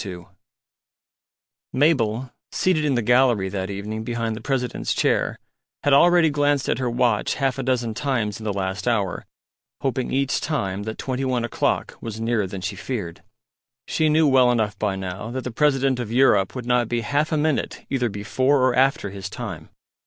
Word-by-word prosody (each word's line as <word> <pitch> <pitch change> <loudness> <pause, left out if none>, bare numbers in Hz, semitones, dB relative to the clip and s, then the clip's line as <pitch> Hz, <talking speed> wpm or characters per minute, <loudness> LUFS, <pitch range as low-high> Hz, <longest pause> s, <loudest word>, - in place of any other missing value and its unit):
II 90 -4 -8 1.5
Mabel, 130 -4 +1 0.2
seated 165 -5 +1
in 140 -3 +2
the 120 - 0
gallery 120 -5 +3
that 95 0 -3
evening 105 +2 -4
behind 115 -1 -2
the 110 - -8
President's 130 -3 -2
chair, - - +1 0.5
had 145 - +3
already 170 +2 +5
glanced 145 -1 +1
at 115 - 0
her 125 -2 0
watch 120 -3 +1
half 135 -2 -1
a - - 0
dozen 125 -3 0
times 115 -4 -1
in - - -9
the 110 - -1
last 95 +2 -3
hour, 105 -6 0 0.5
hoping 130 -1 -1
each 135 0 0
time 100 - -2
that 110 0 -5
twenty 130 0 -3
one 125 -3 0
o'clock 120 - -1
was 110 -1 -6
nearer 115 -3 0
than 95 0 -7
she 100 +3 -3
feared. 100 -6 -5 0.7
She 155 -1 +1
knew 155 +1 +4
well 130 -3 +5
enough 110 -3 0
by 105 -3 0
now 95 +3 -5
that 130 +2 -4
the 125 - -4
President 135 0 +2
of 115 -3 -4
Europe 115 -6 +3
would 125 -2 -5
not 125 -2 +1
be 120 -1 0
half 145 +6 0
a 155 - +1
minute 150 -1 -1
either 125 -3 +1
before 130 +7 +1
or 130 - +2
after 130 -4 +2
his 100 -1 -6
time. 105 -7 -7
120 Hz, 180 wpm, -23 LUFS, 105-135 Hz, 1.5 s, already